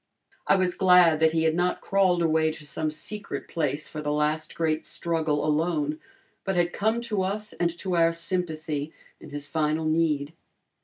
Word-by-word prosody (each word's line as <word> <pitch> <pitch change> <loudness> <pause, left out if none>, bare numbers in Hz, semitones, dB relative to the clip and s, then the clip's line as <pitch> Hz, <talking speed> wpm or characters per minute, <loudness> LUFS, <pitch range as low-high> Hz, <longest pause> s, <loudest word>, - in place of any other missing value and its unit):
I - - +5
was 185 -2 +1
glad 180 -4 +5
that 160 0 +4
he 160 -1 +2
had 160 -1 +3
not 175 +2 0
crawled 185 -3 +2
away 160 -1 +2
to 155 -1 -11
some 155 +2 -1
secret 200 +7 -5
place 150 -2 -2
for 155 - -6
the 150 0 -2
last 150 +1 -1
great 160 -1 0
struggle 160 -1 -1
alone, 155 -1 0 0.4
but 195 -1 -1
had 175 0 +1
come 220 +3 0
to 220 -5 -1
us 210 +3 -2
and 170 - 0
to 185 0 -2
our 165 -1 +4
sympathy 160 -3 -3 0.3
in 155 - -12
his 145 0 -7
final 155 0 0
need. 155 -2 +1
160 Hz, 175 wpm, -26 LUFS, 155-180 Hz, 0.4 s, I